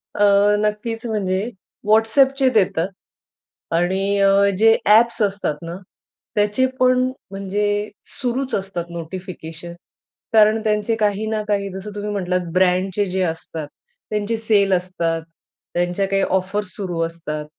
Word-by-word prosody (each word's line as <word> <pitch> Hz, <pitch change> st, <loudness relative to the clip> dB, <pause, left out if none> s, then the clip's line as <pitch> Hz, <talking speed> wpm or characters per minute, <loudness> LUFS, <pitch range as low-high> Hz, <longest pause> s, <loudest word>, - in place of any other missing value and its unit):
अ, 205 Hz, -, +3 dB, 0.4 s
नक्कीच 225 Hz, +2 st, -2 dB
म्हणजे 195 Hz, -4 st, -1 dB, 0.5 s
WhatsAppचे 265 Hz, +5 st, +4 dB
देतात. 185 Hz, -4 st, +2 dB, 0.9 s
आणि 190 Hz, +4 st, +1 dB
अ, 195 Hz, 0 st, +5 dB, 0.3 s
जे 225 Hz, +1 st, +6 dB
ॲप्स 230 Hz, +3 st, +5 dB
असतात 200 Hz, -6 st, 0 dB
ना 170 Hz, +1 st, -6 dB, 0.6 s
त्याचे 210 Hz, +5 st, +3 dB
पण 255 Hz, 0 st, +4 dB, 0.3 s
म्हणजे 205 Hz, +2 st, -1 dB
सुरूच 255 Hz, 0 st, -3 dB
असतात 195 Hz, -3 st, -3 dB
नोटिफिकेशन, 170 Hz, -1 st, -7 dB, 0.6 s
कारण 215 Hz, 0 st, +5 dB
त्यांचे 215 Hz, +1 st, +1 dB
काही 205 Hz, +1 st, +1 dB
ना 215 Hz, -1 st, -1 dB
काही 200 Hz, -1 st, 0 dB
जसं 190 Hz, +3 st, -7 dB
तुम्ही 210 Hz, 0 st, -4 dB
म्हटलात 180 Hz, -2 st, 0 dB
ब्रँडचे 185 Hz, +2 st, +2 dB
जे 185 Hz, +1 st, -1 dB
असतात 160 Hz, -2 st, -3 dB, 0.4 s
त्यांचे 210 Hz, +2 st, -1 dB
सेल 205 Hz, -3 st, +2 dB
असतात, 170 Hz, -3 st, 0 dB, 0.5 s
त्यांच्या 175 Hz, +3 st, 0 dB
काही 195 Hz, 0 st, +1 dB
ऑफर्स 190 Hz, 0 st, -1 dB
सुरू 180 Hz, -4 st, -3 dB
असतात. 155 Hz, -2 st, -5 dB
200 Hz, 125 wpm, -21 LUFS, 180-215 Hz, 0.9 s, जे